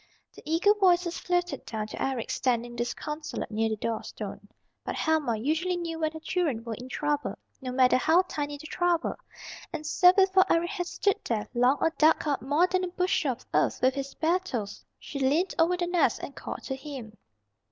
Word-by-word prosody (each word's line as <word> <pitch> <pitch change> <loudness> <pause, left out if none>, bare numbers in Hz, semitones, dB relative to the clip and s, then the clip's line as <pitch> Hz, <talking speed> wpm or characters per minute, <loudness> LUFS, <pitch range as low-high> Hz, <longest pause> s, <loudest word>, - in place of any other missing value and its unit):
Their - - -12
eager 335 +6 +4
voices 360 -2 +3
floated 355 0 -1
down 215 -2 -4
to - - -7
Eric 260 -4 -2
standing 240 -2 0
disconsolate 300 +6 -4
near 220 +1 +1
the 220 - -1
door 225 +1 -2
stone. 205 -1 -8 0.3
But - - -4
Helma 305 -8 +1
usually 320 +9 0
knew 335 -2 -4
when 315 -1 0
her 315 - -7
children 315 -8 -1
were 230 -1 -4
in 250 +3 -8
trouble, 295 +1 -1 0.2
no 255 -1 -4
matter 255 0 +4
how 320 +8 +4
tiny 290 -4 -4
the 300 - -12
trouble, 345 0 0 0.6
and 310 -2 -5
so 360 +4 +6
before 380 0 +4
Eric 345 +2 +2
had 360 -4 -3
stood 400 +2 0
there 220 -3 -1
long 250 +3 +3
or 325 - +2
dug 315 0 +4
up 285 -2 0
more 295 +7 +3
than 370 0 0
a - - 0
bushel 355 -6 0
of 245 - -16
earth - - +2
with 260 +1 +5
his 275 0 -5
bare 330 +4 +2
toes, 240 - -5
she 280 - -7
leaned 295 +8 +2
over 345 +2 +3
the 355 - 0
nest 350 0 +1
and - - -7
called - - -6
to 265 - -3
him. 265 -6 -8
305 Hz, 200 wpm, -28 LUFS, 255-350 Hz, 0.6 s, so